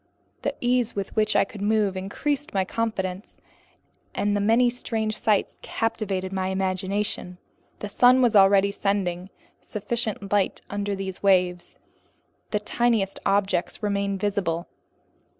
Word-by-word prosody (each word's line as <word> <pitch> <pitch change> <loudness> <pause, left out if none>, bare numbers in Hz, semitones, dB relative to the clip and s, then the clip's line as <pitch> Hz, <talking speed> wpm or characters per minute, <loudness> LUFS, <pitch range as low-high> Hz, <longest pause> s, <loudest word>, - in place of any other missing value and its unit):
The - - -2
ease 245 -1 +1
with 200 -1 -4
which 215 -1 +2
I - - +5
could 200 0 -10
move 210 -2 +1
increased 270 +9 -3
my 190 -1 +2
confidence, 190 -3 -3 0.8
and 205 0 +1
the 205 - +1
many 225 +4 +4
strange 225 -3 -2
sights 210 -2 0
captivated 195 -4 -2
my 190 -1 -1
imagination. 190 0 -2 0.4
The 210 - -3
sun 250 +4 +5
was 240 -3 +3
already 200 0 +6
sending 190 -3 -1 0.3
sufficient 210 -1 -3
light 200 -2 +1
under 205 0 -2
these 190 -1 -5
waves. 180 -3 +2 0.7
The 210 - 0
tiniest 220 -2 0
objects 195 0 0
remained 200 -1 -1
visible. 185 -4 -1
200 Hz, 130 wpm, -25 LUFS, 190-220 Hz, 0.8 s, already